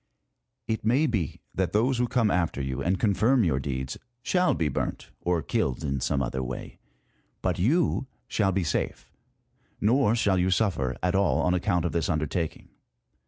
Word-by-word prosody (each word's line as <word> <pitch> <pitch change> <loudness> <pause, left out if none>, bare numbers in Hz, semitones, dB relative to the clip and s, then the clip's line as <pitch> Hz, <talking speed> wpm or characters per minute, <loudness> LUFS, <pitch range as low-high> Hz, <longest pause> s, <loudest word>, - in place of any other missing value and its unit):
It 110 -1 -2
may 125 +8 +3
be 105 - -2
that 95 -2 -1
those 120 +4 +2
who 125 - +2
come 120 -4 +2
after 85 -5 0
you, 65 -2 -3
and 95 +2 0
confirm 110 +4 +3
your 75 -7 +1
deeds, 65 -1 -4 0.2
shall 180 +5 +2
be 80 - 0
burnt, 70 - -3
or 85 -3 0
killed 65 +4 -1
in 70 -2 -1
some 70 +2 0
other 65 +2 -2
way; 65 -1 -6 0.6
but - - 0
you 135 - +2 0.2
shall 100 -3 +1
be 95 0 0
safe, 75 - -2 0.7
nor 115 +1 +3
shall 100 -5 +2
you 90 +1 +2
suffer 90 - +1
at 90 - +2
all 95 -1 +2
on 90 - +2
account 90 -1 +1
of 85 - 0
this 85 +1 -1
under 75 -2 +1
taking. 80 +1 -4
90 Hz, 175 wpm, -27 LUFS, 75-110 Hz, 0.7 s, may